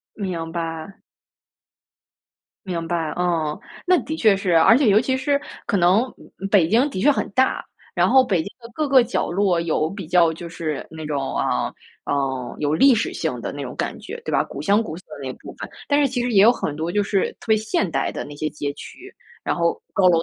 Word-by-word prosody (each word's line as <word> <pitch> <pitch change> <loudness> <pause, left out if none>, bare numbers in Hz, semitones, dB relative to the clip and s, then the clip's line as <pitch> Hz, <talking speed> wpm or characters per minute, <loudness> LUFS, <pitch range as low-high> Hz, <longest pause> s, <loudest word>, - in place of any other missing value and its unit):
明 175 -5 -4
白。 165 +2 -5 1.7
明 170 -3 -3
白， 165 -3 -1
嗯。 165 -4 0 0.3
那 365 -1 +5
的 315 - -4
确 215 -8 +4
是。 190 -2 -1
而 165 +8 +7
且 270 -3 +3
尤 205 +1 +6
其 260 +2 0
是 280 +2 +1 0.3
可 - - +1
能 185 +5 +4 0.5
北 185 -6 +4
京 240 +8 +3
的 190 - -4
确 290 - +5
很 285 - 0
大， 260 +5 +1 0.3
然 - - +3
后 265 0 +6
北 195 -6 +1
京 - - -9 0.2
的 230 - -11
各 305 -2 -1
个 265 -2 +6
角 240 -5 -2
落 185 -2 +2
有 160 -1 0
比 195 -4 -7
较 170 -1 +4
就 170 +1 -8
是 155 -3 -4
那 160 -1 -8
种， 145 -3 -2
啊， - - 0 0.3
呃， 135 -3 -2
有 145 0 0
历 270 +9 +6
史 220 - -1
性 - - -3
的 - - -4
那 - - -6
种 - - -6
感 - - -3
觉， 475 - -8
对 - - -3
吧？ - - +2
古 - - -7
香 205 +2 +3
古 165 -8 -6
色 180 - -11 0.2
的 135 - -6
那 130 - -3
部 - - -11
分。 - - -7 0.2
但 285 0 +3
是 285 - +4
其 250 -2 -2
实 245 0 -1
也 195 -2 +6
有 230 - +7
很 150 -11 -3
多 160 +3 -3
就 205 - +2
是 200 -1 0
特 - - -14
别 220 - +5
现 215 -2 -1
代 - - -1
的 - - -5
那 145 - -9
些 155 +1 -2
街 145 -1 -4
区， - - -11 0.3
然 - - -1
后 170 -1 0
高 190 -2 +4
楼 165 -2 +3
185 Hz, 245 characters per minute, -22 LUFS, 160-225 Hz, 1.7 s, 而